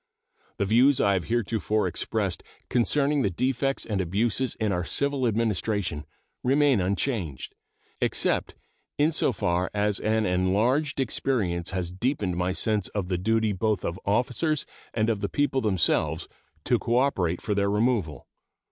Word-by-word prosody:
The 100 - 0
views 125 +7 +4
I 100 - +3
have 90 -3 -1
heretofore 110 -2 0
expressed - - -2 0.3
concerning 140 +4 +2
the 100 - +2
defects 130 +7 -1
and 105 -4 -1
abuses 110 +8 0
in 110 -2 -1
our 90 -1 0
civil 140 +5 0
administration 105 -8 -1 0.4
remain 135 -3 +3
unchanged, 95 - -2 0.5
except - - 0 0.4
in 150 +2 +3
so 150 - +1
far 90 -4 0
as 105 0 +1
an 110 0 +1
enlarged 110 +12 +1
experience 105 -9 -1
has 90 -2 -3
deepened 100 -2 -1
my 90 +1 0
sense 105 0 0
of 100 -3 -4
the 90 -2 0
duty 110 +2 +1
both 105 0 -1
of 85 +3 -3
officers 125 +8 0 0.3
and 110 -1 0
of 110 -3 0
the 100 - -1
people 135 -2 +1
themselves 95 -7 +1 0.4
to - - +2
cooperate 115 -9 +1
for 105 - -2
their 100 0 +1
removal. 105 - 0
110 Hz, 145 wpm, -26 LUFS, 95-125 Hz, 0.5 s, views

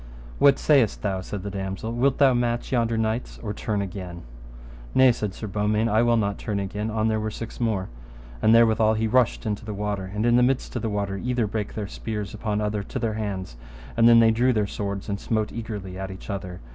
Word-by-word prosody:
What 140 -1 +6
sayest 135 -8 +3
thou, 95 -3 -1
said 95 0 -6
the 100 - -4
damosel, 95 +3 -4
wilt 130 +3 +2
thou 135 -2 +5
match 120 -1 -1
yonder 115 -2 +1
knights 110 +2 -2
or 105 -2 -3
turn 105 -1 -2
again? 90 -3 -7 0.7
Nay, 130 -1 +7
said 105 -4 -3
Sir - - -6
Beaumains, 105 +2 0
I 110 +2 +4
will 120 0 +3
not 100 -2 -1
turn 105 -2 -2
again 105 +2 -3
an 110 0 0
they 110 -1 +1
were 110 0 -2
six 115 +1 -7
more. 110 -6 0 0.5
And 110 - +4
therewithal 110 -1 +5
he 110 +1 0
rushed 125 +2 +2
into 105 0 -2
the 110 -2 -5
water, 100 -1 -2
and 105 +2 -1
in 120 +1 +5
midst 130 +1 0
of 120 - -1
the 110 - -1
water 100 -1 -2
either 125 +2 0
brake 105 0 -4
their 105 - -3
spears 105 +1 -5
upon 105 -1 -2
other 105 -1 -1
to 100 - -6
their 115 -3 -1
hands, 100 - -4 0.4
and 115 0 +6
then 115 0 +8
they 115 -1 +6
drew 120 +3 +3
their 105 -2 +1
swords, 100 -1 -4
and 100 -2 -2
smote 110 -2 -1
eagerly 105 -5 -6
at 95 +1 -6
other. 90 -2 -6
110 Hz, 220 wpm, -25 LUFS, 100-115 Hz, 0.7 s, then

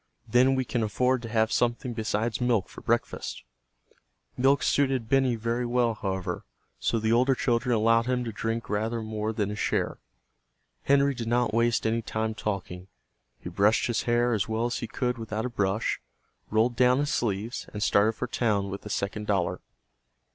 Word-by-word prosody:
Then 130 +2 +4
we 130 -1 0
can 120 0 -1
afford 125 +4 +1
to 115 - -7
have 110 0 +1
something 120 +1 0
besides 110 +1 -1
milk 120 -6 +1
for - - -11
breakfast." - - -2 0.9
Milk 135 +3 +3
suited 135 -5 +1
Benny 130 -1 +3
very 115 +2 -1
well, 120 -1 +1
however, 95 -3 -3 0.4
so 115 - 0
the 110 0 0
older 130 +3 +4
children 120 0 +1
allowed 115 +2 +3
him 125 -1 0
to 115 - -4
drink 115 +2 -3
rather 110 +2 -1
more 110 0 -3
than 105 -2 -1
his 105 - -5
share. - - -1 0.9
Henry 140 0 +4
did 120 -3 -5
not 120 -1 +1
waste 115 0 +2
any 115 +1 +1
time 110 0 -2
talking. 95 -4 -4 0.5
He - - -6
brushed 105 +2 +3
his 120 -2 0
hair 120 +1 +3
as 105 0 -1
well 110 +1 0
as 120 - -2
he 115 - -4
could 125 +1 -2
without 110 0 -3
a - - -1
brush, 100 -2 -1 0.5
rolled 115 +3 +2
down 125 +1 +4
his 145 +1 0
sleeves, 110 +1 -2
and 105 -1 -3
started 105 +2 +3
for 120 - -3
town 105 -5 0
with 100 - -5
the 105 - -9
second 105 +2 -3
dollar. 95 -4 0
115 Hz, 180 wpm, -27 LUFS, 110-125 Hz, 0.9 s, Then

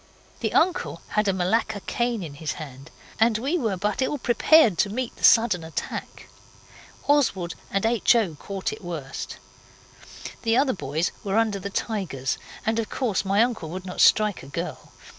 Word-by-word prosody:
The - - -2
uncle 355 +1 +1
had 210 -1 +1
a - - +4
Malacca 205 +3 0
cane 240 -2 -1
in 155 -4 -7
his 150 0 -4
hand, 135 -1 -10 0.3
and 225 -1 +4
we 280 +10 -1
were 220 -8 -1
but 210 +5 -1
ill 275 +3 0
prepared 240 - +4
to 205 - +3
meet 240 +3 -3
the - - -15
sudden 225 -7 +5
attack. 160 0 -6 0.8
Oswald 230 - +2 0.2
and 195 +2 0
H. 230 0 +4
O. 215 -8 +1
caught 195 +5 -4
it - - -10
worst. 155 -6 -6 1.0
The 225 0 +2
other 265 -1 +3
boys 160 -1 -2
were 200 +1 0
under 220 -3 +1
the 200 +1 -5
tigers 190 - -2 0.3
and 220 +1 +1
of 225 - -3
course 225 -9 -1
my 200 +3 +3
uncle 230 -10 -3
would 185 +3 -6
not 180 - -3
strike 210 -2 +4
a - - -11
girl. 135 - -6
205 Hz, 175 wpm, -25 LUFS, 175-235 Hz, 1.0 s, sudden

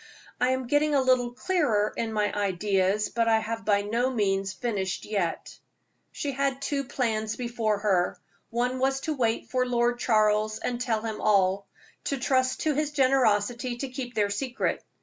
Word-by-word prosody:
"I 250 - +3
am 260 0 0
getting 290 +3 +2
a - - +5
little 255 -2 +3
clearer 245 - +1
in 225 -1 -2
my 210 -1 0
ideas, 200 0 +1
but 230 -1 0
I 225 -1 +5
have 225 +1 -3
by 205 -1 +3
no 235 +5 0
means 195 -5 0
finished 195 -5 -3
yet." 195 -6 -3 0.5
She 285 - -3
had 270 0 -1
two 275 0 -2
plans 220 -4 -1
before 235 -3 -1
her. 195 -4 +1 0.3
One 245 +2 -1
was 270 +1 +1
to 315 - -2
wait 230 -5 -1
for 255 -1 +2
Lord 240 -1 +1
Charles 215 -2 +2
and 245 -1 -3
tell 230 -4 0
him 220 -2 -4
all 195 -1 +2 0.4
to 275 - -1
trust 260 0 +1
to 310 - +1
his 300 +1 0
generosity 250 -3 +2
to 270 +2 -4
keep 250 -1 -6
their 205 -1 +1
secret. 250 +4 -2
235 Hz, 170 wpm, -27 LUFS, 210-260 Hz, 0.5 s, a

